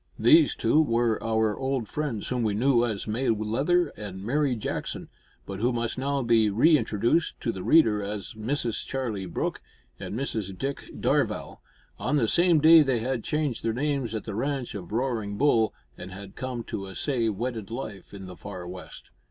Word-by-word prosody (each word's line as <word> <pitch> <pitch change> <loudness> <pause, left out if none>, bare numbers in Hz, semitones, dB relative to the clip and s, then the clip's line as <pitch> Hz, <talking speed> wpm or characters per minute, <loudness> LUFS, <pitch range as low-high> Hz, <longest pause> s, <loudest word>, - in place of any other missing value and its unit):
These 320 -1 +5
two 155 - +3
were 115 -5 +1
our 110 -2 +1
old 130 -4 -2
friends 140 -8 -3
whom 125 -1 -1
we 110 -3 0
knew 120 +1 +3
as 110 -4 -2
May 120 +5 -1
Leather 135 +11 +1
and 95 -5 -8
Mary 135 +3 +1
Jackson, 110 - -4 0.4
but 95 -1 -6
who 120 +4 +2
must 120 -1 -2
now 140 +1 -1
be 115 -2 +4
re 140 +11 +5
introduced 115 +5 +1
to 115 - 0
the 95 - -7
reader 110 - +4
as 100 0 -5
Mrs 115 +1 -2
Charlie 115 -8 -3
Brooke 85 - -3 0.4
and - - -5
Mrs 110 -7 -3
Dick 135 +5 -4
Darvall. - - 0 0.4
On - - 0
the 115 -5 +2
same 170 +4 +4
day 160 +2 +8
they 130 -6 +1
had 125 -1 -2
changed 150 -6 -1
their 115 - -1
names 135 -3 -1
at 110 - -3
the 110 - -6
Ranch 135 +3 -2
of 95 -3 -8
Roaring 110 -4 -1
Bull, 115 -5 +3 0.3
and 95 +1 -8
had 95 +1 -10
come 125 -2 -4
to 95 -3 -5
essay 115 +4 -1
wedded 110 0 -4
life 110 -5 -7
in 100 -2 -9
the 90 -1 -9
far 90 -2 -8
west. 90 +1 -10
115 Hz, 185 wpm, -27 LUFS, 105-135 Hz, 0.4 s, day